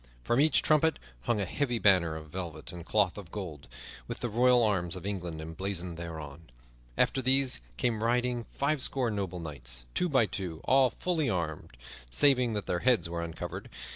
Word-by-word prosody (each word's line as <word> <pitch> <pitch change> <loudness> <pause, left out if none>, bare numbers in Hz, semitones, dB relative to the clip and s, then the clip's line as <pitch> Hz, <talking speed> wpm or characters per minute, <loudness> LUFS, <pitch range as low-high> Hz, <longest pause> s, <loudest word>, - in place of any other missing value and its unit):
From 120 - +1
each 155 +1 +4
trumpet 155 +1 +3 0.3
hung 115 - +1
a 100 - 0
heavy 120 +5 -1
banner 90 -7 +3
of 80 -1 -9
velvet 85 -4 -6
and 85 -1 -8
cloth 105 +1 +1
of 95 -5 -11
gold, 85 -10 -7 0.4
with - - -5
the 120 - -1
royal 125 +2 +4
arms 95 -5 +1
of 95 0 -8
England 90 -5 -4
emblazoned 85 +2 -4
thereon. 80 -2 -8 0.5
After 135 - +2
these 130 - +4 0.2
came 115 - 0
riding 120 0 +1
fivescore 135 -4 0
noble 95 -3 -3
knights, - - -4
two 180 - 0
by 130 -6 +4
two, 90 -6 -5
all 130 0 +4
fully 160 -4 -1
armed, 80 - -3 0.3
saving 125 - +4
that 105 -1 -3
their 85 - -1
heads 120 -7 +2
were 85 0 -2
uncovered. 85 -1 -6
100 Hz, 170 wpm, -30 LUFS, 85-125 Hz, 0.5 s, each